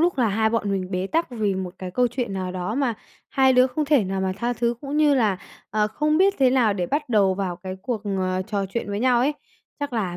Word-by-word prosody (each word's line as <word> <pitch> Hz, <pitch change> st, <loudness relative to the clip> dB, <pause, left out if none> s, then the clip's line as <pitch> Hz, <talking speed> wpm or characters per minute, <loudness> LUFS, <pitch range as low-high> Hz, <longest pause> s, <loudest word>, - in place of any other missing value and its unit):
lúc 340 Hz, -4 st, +2 dB
là 235 Hz, -, +3 dB
hai 220 Hz, +2 st, +1 dB
bọn 220 Hz, -3 st, 0 dB
mình 185 Hz, -1 st, -2 dB
bế 185 Hz, 0 st, -1 dB
tắc 330 Hz, +4 st, 0 dB
vì 215 Hz, -5 st, -1 dB
một 185 Hz, -1 st, -4 dB
cái 185 Hz, -1 st, -6 dB
câu 245 Hz, +6 st, +2 dB
chuyện 240 Hz, -4 st, -3 dB
nào 185 Hz, -1 st, -3 dB
đó 185 Hz, +4 st, -3 dB
mà 265 Hz, -5 st, 0 dB, 0.3 s
hai 265 Hz, -1 st, +4 dB
đứa 250 Hz, 0 st, +5 dB
không 300 Hz, +4 st, -2 dB
thể 280 Hz, -7 st, +3 dB
nào 190 Hz, 0 st, -2 dB
mà 190 Hz, 0 st, 0 dB
tha 240 Hz, +3 st, -1 dB
thứ, 240 Hz, 0 st, 0 dB
cũng 285 Hz, +1 st, -4 dB
như 300 Hz, -2 st, +4 dB
là, 215 Hz, -7 st, +2 dB, 0.3 s
ờ, 210 Hz, 0 st, +2 dB
không 305 Hz, +8 st, +1 dB
biết 390 Hz, +1 st, +4 dB
thế 260 Hz, -2 st, +5 dB
nào 245 Hz, -5 st, +3 dB
để 180 Hz, -3 st, -2 dB
bắt 295 Hz, -1 st, -2 dB
đầu 200 Hz, -5 st, +3 dB
vào 185 Hz, -3 st, -3 dB
cái 185 Hz, +1 st, -7 dB
cuộc, 240 Hz, -5 st, -3 dB
à, 185 Hz, -2 st, -1 dB
trò 200 Hz, 0 st, -2 dB
chuyện 205 Hz, +3 st, -4 dB
với 205 Hz, +1 st, -2 dB
nhau 250 Hz, -1 st, +3 dB
ấy. 285 Hz, +4 st, +2 dB, 0.5 s
Chắc 285 Hz, -2 st, -3 dB
là 195 Hz, -7 st, -2 dB
220 Hz, 265 wpm, -23 LUFS, 190-260 Hz, 0.5 s, đứa